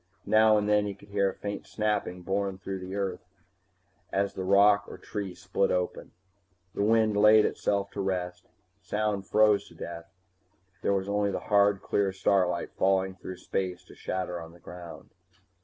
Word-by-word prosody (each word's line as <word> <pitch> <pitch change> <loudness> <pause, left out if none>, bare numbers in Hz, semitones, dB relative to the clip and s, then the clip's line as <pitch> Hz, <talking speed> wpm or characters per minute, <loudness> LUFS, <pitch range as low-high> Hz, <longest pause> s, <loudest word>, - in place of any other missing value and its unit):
Now 110 0 +5
and 105 0 0
then 105 0 +3
he 100 - -4
could 100 +1 -18
hear 100 -1 +2
a - - -8
faint 100 -1 -6
snapping 105 -4 -2
borne 95 0 -1
through 95 0 -5
the 95 +1 -6
earth 95 -3 -3 0.9
as 100 0 0
rock 100 +2 +4
or - - -9
tree 100 -4 -5
split 95 +1 0
open. 90 0 -2 0.6
The - - -3
wind 110 0 +3
laid 105 +1 +6
itself 100 -1 -1
to 100 - -4
rest, 90 -2 -3 0.3
sound 100 0 -2
froze 105 -1 +4
to - - -17
death, 85 +2 -8 0.7
there - - +1
was 95 0 -1
only 100 0 +1
the 100 - -2
hard 100 -1 +2
clear 100 -1 +1
starlight 95 -2 +1
falling 95 0 +1
through 95 0 -8
space 90 -1 -3
to - - -16
shatter 90 -2 -4
on 80 0 -11
the 85 - -17
ground. 85 -1 -11
100 Hz, 170 wpm, -28 LUFS, 95-105 Hz, 0.9 s, laid